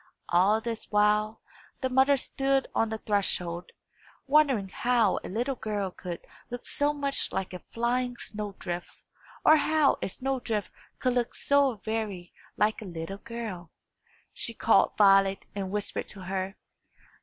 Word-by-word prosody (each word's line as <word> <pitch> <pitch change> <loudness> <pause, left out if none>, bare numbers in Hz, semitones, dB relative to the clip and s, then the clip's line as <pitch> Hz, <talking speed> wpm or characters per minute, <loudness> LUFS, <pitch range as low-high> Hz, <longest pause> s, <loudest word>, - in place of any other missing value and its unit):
All 190 +5 +4
this 230 -1 -4
while, 210 +1 +2 0.4
the 260 - +1
mother 265 +2 +4
stood 270 +1 +1
on 225 - +1
the 220 - -3
threshold, 180 -5 -1 0.6
wondering 275 -8 +3
how 235 -2 +2
a - - -6
little 240 +8 -1
girl 210 -5 -3
could 175 -1 -7 0.2
look 245 0 -6
so 290 +1 +2
much 280 -1 -2
like 190 -1 -3
a 180 - -7
flying 245 +1 -1
snow 210 -3 -5
drift, 175 -1 -4 0.6
or 310 - +8
how 310 -1 +3
a - - -1
snow 265 +6 -2
drift 215 -4 -2 0.3
could 255 -1 +1
look 245 -1 -1
so 280 -3 +3
very 215 -5 -3 0.2
like 215 +1 +2
a - - -7
little 175 +2 -6
girl. 215 -8 -6 0.6
She 230 - -3
called 215 -3 +4
Violet, 195 -1 +5
and 195 -2 -3
whispered 205 +1 -2
to 200 - -6
her. 190 +1 -3
215 Hz, 150 wpm, -28 LUFS, 195-250 Hz, 0.6 s, or